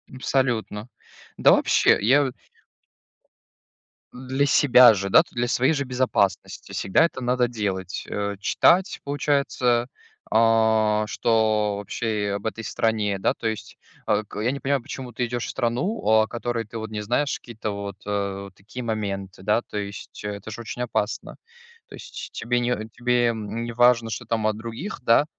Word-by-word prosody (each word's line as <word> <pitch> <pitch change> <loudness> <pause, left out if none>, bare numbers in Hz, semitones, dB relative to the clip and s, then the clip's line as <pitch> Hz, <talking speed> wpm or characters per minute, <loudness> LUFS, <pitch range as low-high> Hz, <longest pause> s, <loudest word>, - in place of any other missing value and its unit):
Абсолютно. 120 -4 -1 0.5
Да, - - +6
вообще, - - +4
я 135 +7 +4
вот 130 -2 -3 1.8
Для 130 +2 -1
себя 125 -4 +7
же, 100 0 -3
да, - - +7
то - - -23
для 120 0 0
своей 130 +4 +2
же 140 -2 -1
безопасности 125 -7 -1
всегда 95 +11 +2
это 150 - -4
надо 125 0 +1
делать. 95 -5 -3
Э, 100 0 -2
читать, 180 - +3
получается, 140 -4 +1 0.4
а 110 -1 +3
что, 110 -3 +1
вообще, 105 0 -2
об 100 - -6
этой 115 +1 -4
стране. 105 -3 0
Да, - - +1
то 115 - -4
есть, 110 -2 -5 0.3
э, 110 - +2
к - - -7
я 120 +4 +1
не 140 - -4
понимаю, 140 -1 0
почему 125 +1 -7
ты 125 - -2
идёшь 120 0 -3
в - - -6
страну, 130 - -1
о 110 0 +4
которой 120 -1 -3
ты, 115 +2 -8
вот, 110 -1 -5
не 105 -1 -4
знаешь 130 +6 0
какие-то, 110 -3 -6
вот, 100 -1 -6
э, 100 -1 -2
вот 100 - -11
такие 110 +6 -9
моменты 100 -4 -4
да. 105 +3 +2
То 105 - -8
есть, 100 0 -7
это 105 +1 -6
ж 115 - -8
очень 120 +2 -5
опасно. 110 -2 -3 0.5
То - - -10
есть, - - -9
тебе 120 +1 -1
не 120 -3 -1
тебе, 125 0 +1
м, 110 +1 -5
не 120 - -5
важно, 120 -1 +4
что 120 +1 -5
там 110 -1 -1
от 110 0 -1
других, 115 - -6
да? 120 +5 +4
115 Hz, 170 wpm, -24 LUFS, 105-125 Hz, 1.8 s, себя